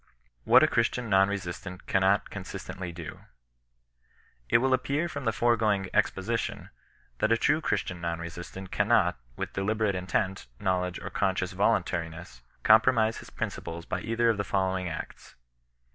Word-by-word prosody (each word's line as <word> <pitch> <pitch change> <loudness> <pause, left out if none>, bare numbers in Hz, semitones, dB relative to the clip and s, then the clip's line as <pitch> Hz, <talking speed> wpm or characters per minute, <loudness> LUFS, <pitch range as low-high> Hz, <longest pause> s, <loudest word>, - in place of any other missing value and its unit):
WHAT - - +7
A - - +6
CHEISTIAN 115 0 0
NON 95 +1 +5
RESISTANT 90 -2 -5
CANNOT 95 +1 +2
CON - - -6
SISTENTLY 95 -2 -6
DO. 85 -2 -8 1.3
It - - +6
will 130 +2 +2
appear 145 +5 0
from 140 -5 -6
the 115 - +3
foregoing 110 -5 +1
exposition, 115 +5 -1 0.5
that 110 - +2
a 115 - +5
true 150 +7 +2
Christian 90 - -2
non 85 -1 -2
resistant 85 +3 -8
cannot^ - - +3 0.2
with - - -5
deliberate 105 +1 0
in 90 0 -4
tent, 95 - -1
knowledge, 90 -2 0
or - - -7
conscious - - 0
voluntariness, 80 -6 -1 0.2
compromit 110 0 +5
his - - -12
principles 85 0 -5
by - - -3
either 115 +1 +2
of 110 - -3
the 100 - 0
following 95 -2 0
acts. 80 - -8
95 Hz, 150 wpm, -28 LUFS, 90-115 Hz, 1.3 s, WHAT